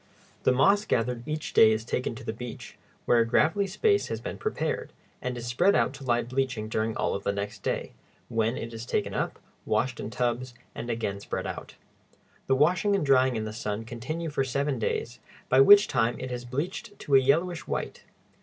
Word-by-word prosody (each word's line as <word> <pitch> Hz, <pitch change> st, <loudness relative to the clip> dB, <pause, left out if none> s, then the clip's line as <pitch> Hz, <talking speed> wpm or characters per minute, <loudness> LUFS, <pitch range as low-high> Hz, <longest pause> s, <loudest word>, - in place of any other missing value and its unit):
The -, -, +6 dB
moss 195 Hz, +11 st, +4 dB
gathered 120 Hz, -, -1 dB
each 155 Hz, 0 st, -4 dB
day 110 Hz, -, +7 dB
is 110 Hz, 0 st, -1 dB
taken 125 Hz, -1 st, -2 dB
to 125 Hz, -, -10 dB
the 110 Hz, -, -3 dB
beach, 120 Hz, 0 st, -8 dB, 0.3 s
where 120 Hz, -, +4 dB
a -, -, +5 dB
gravelly 160 Hz, +11 st, +2 dB
space 405 Hz, -, +2 dB
has -, -, -3 dB
been -, -, -6 dB
prepared, 435 Hz, -, -2 dB, 0.3 s
and 125 Hz, -1 st, -3 dB
is 120 Hz, -, -6 dB
spread 125 Hz, +12 st, +3 dB
out -, -, +2 dB
to 135 Hz, 0 st, -10 dB
lie 120 Hz, -2 st, +1 dB
bleaching 125 Hz, -3 st, -2 dB
during 110 Hz, 0 st, -1 dB
all -, -, 0 dB
of 100 Hz, -, -4 dB
the -, -, +1 dB
next 100 Hz, 0 st, -5 dB
day, -, -, -2 dB, 0.3 s
when 115 Hz, +1 st, 0 dB
it 115 Hz, 0 st, -6 dB
is 115 Hz, +1 st, -7 dB
taken -, -, -1 dB
up, -, -, -2 dB, 0.3 s
washed 120 Hz, +3 st, 0 dB
in -, -, -4 dB
tubs, 120 Hz, +2 st, -2 dB, 0.2 s
and 120 Hz, -, -6 dB
again 110 Hz, -4 st, -2 dB
spread -, -, -4 dB
out. -, -, -6 dB, 0.7 s
The 135 Hz, -, +3 dB
washing 175 Hz, +8 st, +3 dB
and 195 Hz, -, 0 dB
drying 130 Hz, -2 st, +4 dB
in 110 Hz, -1 st, -2 dB
the 110 Hz, -, -5 dB
sun 110 Hz, -1 st, -4 dB
continue 155 Hz, +8 st, -5 dB
for 140 Hz, -2 st, 0 dB
seven 135 Hz, 0 st, -1 dB
days, 115 Hz, +2 st, -2 dB, 0.3 s
by 130 Hz, +1 st, +6 dB
which 205 Hz, +8 st, +8 dB
time 120 Hz, -1 st, +1 dB
it 130 Hz, -, -5 dB
has 125 Hz, 0 st, -5 dB
bleached 155 Hz, +10 st, -4 dB
to 145 Hz, -, -4 dB
a 135 Hz, -, +9 dB
yellowish 165 Hz, +6 st, +1 dB
white. -, -, -4 dB
125 Hz, 205 wpm, -27 LUFS, 115-145 Hz, 0.7 s, a